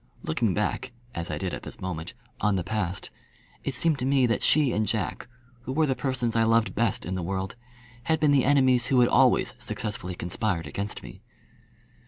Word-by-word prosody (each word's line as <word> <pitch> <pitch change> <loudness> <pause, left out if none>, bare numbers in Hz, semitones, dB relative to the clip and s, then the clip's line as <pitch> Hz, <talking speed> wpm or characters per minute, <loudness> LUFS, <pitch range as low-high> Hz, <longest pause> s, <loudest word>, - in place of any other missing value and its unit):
Looking 95 +4 0
back 120 +4 -1 0.2
as 85 +1 -3
I - - -2
did 95 -2 -3
at - - -4
this - - -7
moment 90 +3 -5 0.2
on 105 -2 +2
the 90 - -1
past, 95 -3 -3 0.5
it 135 - -2
seemed 155 +2 +2
to 125 - -1
me 135 -2 +4
that 115 -1 +1
she 150 -5 +3
and 105 0 0
Jack, 110 -4 -2 0.3
who 120 - -6
were 155 +4 +2
the 135 - +1
two 125 - -14
persons 125 -4 0
I 115 - +4
loved 115 0 +3
best 115 -3 0
in 90 - -3
the 95 - -2
world, 95 +4 -3 0.5
had 160 0 +2
been 150 -2 +4
the 140 -3 +4
enemies 130 -3 +4
who 130 -2 +4
had 120 - +4
always - - +4
successfully 95 -4 -4
conspired 90 -1 -2
against 100 +7 -5
me. - - -11
115 Hz, 205 wpm, -27 LUFS, 95-130 Hz, 0.5 s, me